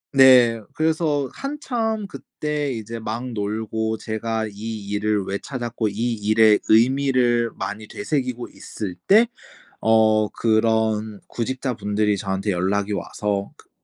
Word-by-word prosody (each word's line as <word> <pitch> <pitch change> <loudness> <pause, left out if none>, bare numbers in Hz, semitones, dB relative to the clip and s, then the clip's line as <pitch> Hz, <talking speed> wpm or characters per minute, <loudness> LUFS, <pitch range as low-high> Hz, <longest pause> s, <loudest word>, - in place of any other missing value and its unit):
네. 125 -4 +7
그래서 155 -3 +1
한참 240 -7 -2
그때 150 -6 -4
이제 115 -1 -5
막 110 +3 -4
놀고 110 +1 -2
제가 110 +1 -2
이 105 0 -6
일을 105 0 0
왜 100 +1 -3
찾았고 120 -4 -3
이 115 +4 -1
일의 110 0 +4
의미를 120 0 +3
많이 105 +1 -5
되새기고 130 - -3
있을 95 -5 -7
때 220 +4 +6 0.6
어 110 -1 +4
그런 110 -2 +1
구직자분들이 110 -4 -1
저한테 95 +1 -2
연락이 100 +3 0
와서 100 0 -3
그 - - -20
110 Hz, 240 characters per minute, -22 LUFS, 105-130 Hz, 0.6 s, 네